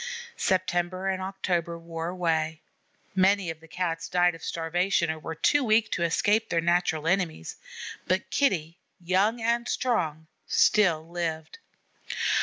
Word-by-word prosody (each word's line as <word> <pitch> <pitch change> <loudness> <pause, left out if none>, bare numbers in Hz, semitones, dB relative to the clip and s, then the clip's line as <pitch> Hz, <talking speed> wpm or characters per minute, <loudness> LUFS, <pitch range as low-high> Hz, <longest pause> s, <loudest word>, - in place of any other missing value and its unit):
September 185 0 0
and 190 -1 -1
October 180 -3 -2
wore 165 0 -5
away. 160 -3 -1 0.5
Many 190 -1 +3
of 160 - -10
the 165 - -16
Cats 165 -1 -3
died 175 0 +3
of 165 - -11
starvation 170 +1 0
or 160 - -6
were 160 +1 -6
too 290 - +3
weak 220 -1 +3
to - - -1
escape 205 +6 +2
their 170 - +1
natural 170 -2 +1
enemies. 180 -2 -1 0.5
But - - 0
Kitty, 175 - +1 0.2
young 190 +6 +1
and 235 +1 0
strong, 160 -11 0 0.2
still 170 -7 +3
lived. 170 - -4
175 Hz, 135 wpm, -27 LUFS, 165-195 Hz, 0.5 s, Many